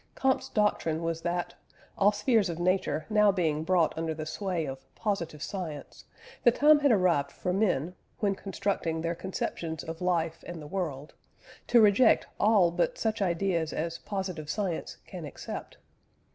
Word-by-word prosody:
Comte's 265 -1 +1
doctrine 170 -6 +1
was 165 0 -2
that, 175 +1 -2 0.4
all 200 +1 +4
spheres 210 -1 +2
of 165 - -4
Nature 175 -3 0
now 210 -1 +4
being 160 -5 0
brought 175 -1 +2
under 160 -1 -2
the 155 0 -5
sway 175 0 -2
of 135 -1 -6
positive 170 -8 -3
science, 165 -7 -6 0.4
the - - +8
time 295 +5 +5
had 285 -2 +4
arrived 175 -9 +2
for 180 - -3
men, 180 -5 +1 0.2
when 200 -2 +1
constructing 195 -4 -2
their 170 +1 -1
conceptions 165 -2 -4
of 160 +1 -7
life 165 -2 0
and 175 -1 -6
the 150 - -9
world, 150 -5 -4 0.5
to 240 - +6
reject 215 +3 +5
all 205 -5 +4
but 175 +1 0
such 220 -1 -1
ideas 170 -3 0
as 165 +1 -3
positive 185 -7 -4
science 190 -4 -3
can - - -8
accept. - - -7
180 Hz, 160 wpm, -29 LUFS, 160-205 Hz, 0.5 s, the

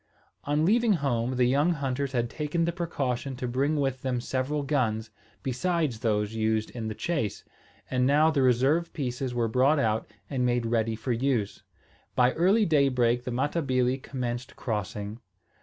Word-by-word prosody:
On 150 +2 +1
leaving 225 +3 +4
home, 130 -6 0
the 125 0 +3
young 145 +7 +3
hunters 140 -2 -2
had 120 -2 +1
taken 150 +5 -1
the 170 - 0
precaution 140 -7 -2
to 125 0 -4
bring 135 +5 0
with 135 -3 -1
them 130 -2 -1
several 135 +4 -2
guns, 115 -6 0 0.3
besides 140 -1 -1
those 105 -2 0
used 110 0 0
in 115 -2 -5
the 110 - -4
chase; 145 - -2 0.4
and 125 -1 +1
now 150 +3 +4
the 145 -3 +1
reserve 130 +7 +3
pieces 125 -3 -3
were 120 -1 +1
brought 130 +7 +3
out 110 -5 0 0.2
and 130 -3 -1
made 120 -1 +1
ready 115 -1 0
for 125 +3 -3
use. 120 -4 0 0.5
By 125 0 +4
early 195 +6 +3
daybreak 125 -6 +2
the 125 - -3
Matabili 130 -1 0
commenced 125 -2 -4
crossing. 105 -1 -4
130 Hz, 160 wpm, -27 LUFS, 120-145 Hz, 0.5 s, leaving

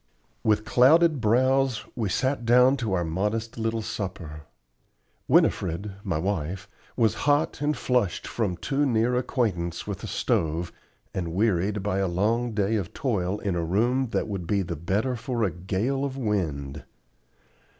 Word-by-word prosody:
With 105 -1 +2
clouded 140 +7 +5
brows 130 +2 +2
we 110 -5 -1
sat 130 +4 0
down 125 +3 +5
to 115 -6 -2
our 90 -2 +1
modest 105 +8 -2
little 115 0 -1
supper. 85 -8 -6 0.8
Winifred, 95 +3 +2
my 80 - -1
wife, 90 0 -2 0.3
was 110 -3 +3 0.2
hot 145 -1 +2
and 150 -1 0
flushed 125 -7 0
from 100 -7 -2
too 140 +8 0
near 120 0 +2
acquaintance 105 -10 -1
with - - -4
the - - -7
stove, 85 +1 -1 0.4
and 85 -2 -3
wearied 100 -1 +1
by 100 -1 0
a 95 - +1
long 110 +7 0
day 105 +1 +1
of 95 -5 -5
toil 105 - -1
in 100 -3 -1
a 85 - -1
room 120 +10 +1
that - - -1
would 95 -5 -4
be 100 0 +1
the 85 -1 -4
better 100 - -1
for 120 0 -2
a 95 - +1
gale 100 - -2
of 135 -1 -3
wind. 75 - -2
105 Hz, 155 wpm, -26 LUFS, 90-125 Hz, 0.8 s, clouded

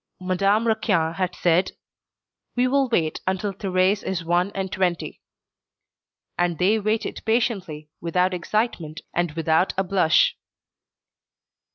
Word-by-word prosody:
Madame 195 +4 +1
Raquin 200 -7 +1
had 185 0 -2
said: 175 +2 +2 0.8
"We 250 +1 +2
will 270 0 +2
wait 160 -9 0
until 190 +2 -1
Thérèse 190 0 +1
is 180 -3 -3
one 175 +3 +1
and 190 -1 -3
twenty." 180 -3 -2 1.2
And 175 -2 +1
they 205 +6 +3
waited 215 +1 -2
patiently, 190 - -1
without 180 +2 +1
excitement, 175 -4 -2
and 175 -2 0
without 160 +2 +1
a 190 - +2
blush. 180 -4 +3
185 Hz, 120 wpm, -23 LUFS, 170-205 Hz, 1.2 s, they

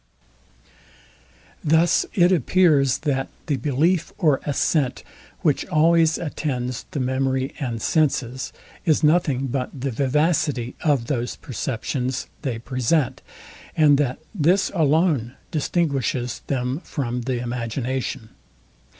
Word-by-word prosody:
Thus 160 +3 +3
it 175 -2 +5
appears, 155 -5 +3
that 135 -2 0 0.2
the 145 -5 0
belief 155 +5 +1
or 150 -8 +2
assent, 140 -2 0 0.4
which 150 -6 +2
always 165 -1 +4
attends 130 -6 -3
the 145 - -4
memory 130 +1 0
and 120 -6 -3
senses, 130 -3 0 0.3
is 160 -1 +2
nothing 150 -4 +3
but 130 0 -2
the 135 +1 -2
vivacity 140 -1 +1
of 145 -7 +2
those 120 -2 -2
perceptions 130 -1 -3 0.2
they 130 -6 -2
present; 130 +4 0 0.6
and 145 -3 +5
that 130 -3 0 0.2
this 185 +1 +2
alone 155 - +2 0.2
distinguishes 140 -6 -1
them 130 +1 -1
from 125 -4 -3
the 125 0 -2
imagination. 120 0 -3
140 Hz, 105 wpm, -23 LUFS, 125-155 Hz, 0.6 s, it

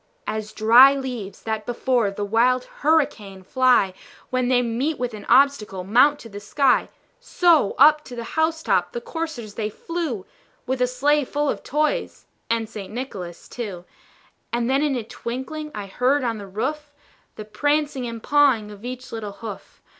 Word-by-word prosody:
As 215 0 -4
dry 240 +6 +7
leaves 250 -7 -6
that 220 -1 -3
before 240 -2 +1
the 200 +1 -4
wild 245 +4 +2 0.2
hurricane 230 -11 +1
fly, 250 -4 +3 0.4
When 255 -1 +1
they 245 -1 +3
meet 255 +6 -1
with 245 -2 -3
an 210 - -9
obstacle, 240 -8 +3
mount 250 +9 +4
to - - -10
the 205 -1 -8
sky, 255 +6 +2 0.3
So, 335 - +3
up 300 +2 +6
to 245 - -9
the 235 - -5
house 320 0 0
top - - +1
the 480 - -3
coursers 320 - -5
they 215 -1 -3
flew, 295 - -4 0.4
With 260 0 -2
a 250 - +4
sleigh 285 +4 +2
full 290 +2 -1
of - - -6
toys 305 - -1 0.2
and 230 -1 0
St. 205 -3 -8
Nicholas 195 -8 -7
too. 200 -7 -6 0.7
And 235 0 0
then 270 +2 +2
in 295 -2 +1
a 240 - -3
twinkling 260 +7 -6
I 205 -1 -5
heard 255 +8 +1
on 230 -3 -2
the 200 - -8
roof, 290 +9 -4 0.4
The 215 - -8
prancing 290 +3 -1
and 230 -1 -7
pawing 270 -8 +3
of 205 0 -13
each 255 +1 -7
little 215 -3 -5
hoof. 210 -2 -10
245 Hz, 170 wpm, -23 LUFS, 215-285 Hz, 0.7 s, dry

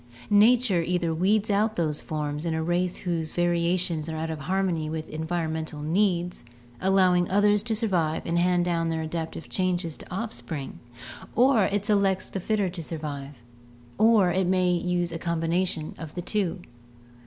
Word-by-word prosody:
Nature 215 -2 +5
either 170 -1 0
weeds 205 +6 +2
out 215 +2 +2
those 155 -3 -1
forms 150 -1 -3
in 165 -2 -1
a 160 - -1
race 175 +2 0
whose 165 -4 -2
variations 175 -2 0
are 160 - -4
out 160 +1 -3
of 160 - -5
harmony 170 -1 -1
with 155 0 -4
environmental 160 -1 -3
needs, 175 +1 0 0.4
allowing 185 -2 +3
the - - -9
others 205 +1 +4
to 220 +1 -1
survive 180 -8 0
and 170 +1 +1
hand 175 0 +2
down 165 -1 0
their 160 -1 -1
adaptive 160 0 -5
changes 180 -4 -1
to - - -12
offspring, 180 - -5 0.6
or 245 -3 +5
it 205 0 -1
selects 195 -3 +1
the 195 - -4
fitter 205 +1 0
to 175 -1 -6
survive, 145 -3 -6 0.6
or 215 -5 +5
it 185 0 +1
may 185 -1 +3
use 175 0 0
a 165 - -4
combination 170 -1 -1
of 160 -2 -8
the 175 - -3
two. 195 -2 -1
175 Hz, 165 wpm, -26 LUFS, 160-195 Hz, 0.6 s, Nature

